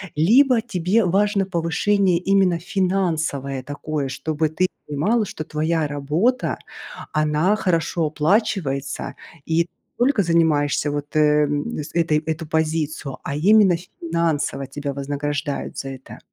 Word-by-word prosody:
либо 235 - +5
тебе 190 0 +1
важно 200 +2 +2
повышение 185 +2 +1
именно 185 -1 +2
финансовое 165 -8 -1
такое, 145 +1 -4
чтобы 155 +3 -2
ты 185 +4 +1 0.2
понимала, 205 +11 +1
что 155 - -6
твоя 155 +1 -1
работа- 155 - 0 0.6
она 155 +6 +2
хорошо 170 -4 0
оплачивается 150 - -1 0.3
и 160 - 0
не 170 - -21 0.4
только 260 -7 +2
занимаешься 155 -4 +2
вот, 145 +1 -5
э, 150 -1 +4
с 145 +1 -3
этой 165 -3 +2
эту 160 0 -4
позицию, 155 -3 -2
а 140 - -3
именно 195 +3 +5 0.2
финансово 160 -5 -1
тебя 140 0 -5
вознаграждают 145 +1 -3
за 135 - -4
это? 135 -1 -10
160 Hz, 120 wpm, -22 LUFS, 145-185 Hz, 0.6 s, либо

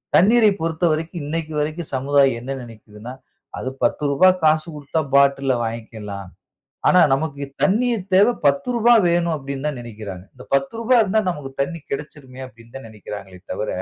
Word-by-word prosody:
தண்ணீரை 215 +4 +5
பொறுத்தவரைக்கும் 165 0 -1
இன்னைக்கு 160 +1 -3
வரைக்கும் 155 +2 -3
சமுதாயம் 135 -2 +2
என்ன 135 +3 -4
நினைக்கிதுன்னா, 115 0 -11 0.5
அது 130 - -3
10 - - +1
ரூபாய் 185 +5 +4
காசு 155 +1 +3
கொடுத்தா 150 +2 -2
பாட்டில்‌ல 140 -1 +3
வாங்கிக்கலாம். 110 -4 -6 0.6
ஆனா, 180 - +6
நமக்கு 140 0 -3 0.2
தண்ணீர் 220 -1 +1
தேவை 205 +6 +6
10 280 -2 +2
ரூபாய் 235 -1 +5
வேணும் 170 -1 +1
அப்பிடின்னு 140 0 -5
தான் 145 -4 -5
நினைக்கிறாங்க. 105 -5 -8
இந்த 125 - -13
10 135 +9 0
ரூபா 240 +3 +2
இருந்தா 215 +1 +1
நமக்கு 145 -5 -7
தண்ணீ 165 +3 -5
கெடச்சுருமே! 140 -2 -7
அப்பிடின்னு 115 0 -18
தான் 135 - -11
நினைக்கிறாங்களே 100 -3 -10
தவிர, 105 - -3
145 Hz, 150 wpm, -21 LUFS, 120-175 Hz, 0.6 s, ஆனா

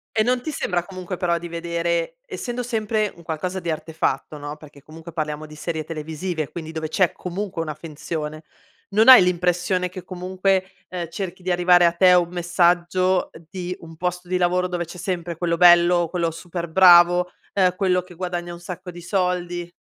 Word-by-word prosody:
E 220 - +4
non 245 +2 +1
ti 310 - -4
sembra, 180 - -1
comunque, 185 -1 -6
però 170 -1 0
di 175 - -7
vedere 170 - -2
essendo 250 - -4
sempre 220 -3 -1
un 170 - -15
qualcosa 175 +4 -3
di 170 -2 -3
artefatto, 155 -2 -2
no, 145 +1 -7
perché 145 -2 -15
comunque 165 +2 -11
parliamo 155 -1 -4
di 155 - -12
serie 160 0 -4
televisive, 160 +1 -4
quindi 160 -2 -7
dove 160 -1 -4
c'è 180 +2 +2
comunque 180 -1 -4
una 155 -1 -4
finzione, 155 0 -6 0.5
non 215 +3 +3
hai 255 -7 +11
l'impressione 180 +1 0
che 185 0 -9
comunque, 185 +1 -1 0.2
ehm, 175 -3 -5
cerchi 185 +1 -6
di 185 - -4
arrivare 175 0 +5
a 170 - +3
te 180 +1 +5
un 175 -1 +3
messaggio, 175 +1 +1
ehm, 165 - -15
di 180 -2 -5
un 165 -1 -12
posto 180 +1 -3
di 185 +1 0
lavoro 180 +1 +1
dove 175 -1 -3
c'è 175 - -11
sempre 175 -1 -3
quello 170 0 -1
bello, 175 0 +6
quello 170 -1 0
super 170 +1 -6
bravo, 175 0 +6 0.2
ehm, 185 -2 +3
quello 180 -2 +1
che 180 - -14
guadagna 175 -1 -4
un 170 - -10
sacco 180 +1 -8
di 175 0 -11
soldi? 175 -1 -1
175 Hz, 190 wpm, -22 LUFS, 165-185 Hz, 0.5 s, hai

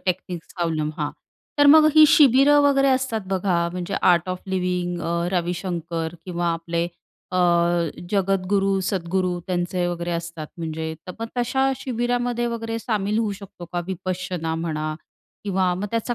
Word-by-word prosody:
टेक्निक्सचा 180 -1 -3
अवलंब 155 -2 -1
हां, 150 -1 -1 0.5
तर 290 - +6
मग 310 +1 +8
ही 310 0 +9
शिबिरं 285 +1 +6
वगैरे 275 -1 +4
असतात 260 -4 +1
बघा. 185 -2 +1
म्हणजे 180 +2 -4
आर्ट 175 0 +4
ऑफ 185 0 -3
लिव्हिंग 180 -2 -1
अ, 170 +1 -1
रविशंकर 170 -2 -2
किंवा 175 -1 -2
आपले 170 0 -2 0.5
अ, 185 - +1 0.7
जगतगुरू 195 0 +1
सद्गुरू 185 -1 -1
त्यांचे 180 0 -1
वगैरे 175 0 -3
असतात 165 -2 -4
म्हणजे 160 -1 -4
तर 180 - -6
मग 230 - -2
तशा 265 +3 +1
शिबिरामध्ये 245 -1 -1
वगैरे 230 -1 -3
सामील 215 -2 -1
होऊ 215 -3 0
शकतो 195 -3 -10
का? 175 - -1
विपश्यना 180 -3 -3
म्हणा 155 -2 -2 0.5
किंवा 190 -2 +1
मग 195 +3 -3
त्याचा 230 +1 -1
185 Hz, 145 wpm, -23 LUFS, 170-225 Hz, 0.7 s, ही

